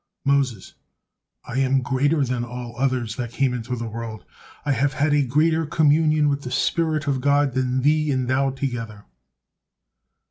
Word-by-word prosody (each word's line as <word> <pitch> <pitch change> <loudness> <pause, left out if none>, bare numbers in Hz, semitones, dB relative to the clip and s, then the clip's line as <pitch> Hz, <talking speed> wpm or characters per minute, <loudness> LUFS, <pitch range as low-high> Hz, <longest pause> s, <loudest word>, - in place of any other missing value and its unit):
Moses: 135 -8 0 0.7
"I 125 +2 -3
am 135 -1 +2
greater 140 +3 +1
than 125 -1 -2
all 120 0 -7
others 125 -3 -1
that 120 -2 -3
came 130 +1 0
into 125 +1 -3
the 115 -1 -5
world, 115 -1 -7 0.4
I 145 - +1
have 135 +2 +1
had 145 +2 +1
a 145 -1 +3
greater 155 +5 +2
communion 155 0 +3
with 140 0 0
the 125 - -6
spirit 155 +2 0
of 135 -3 0
God 140 0 +2
than 130 0 0
thee 150 +1 +2
and 130 -3 0
thou 135 +2 +2
together." 120 -6 -5
135 Hz, 165 wpm, -23 LUFS, 125-145 Hz, 0.7 s, a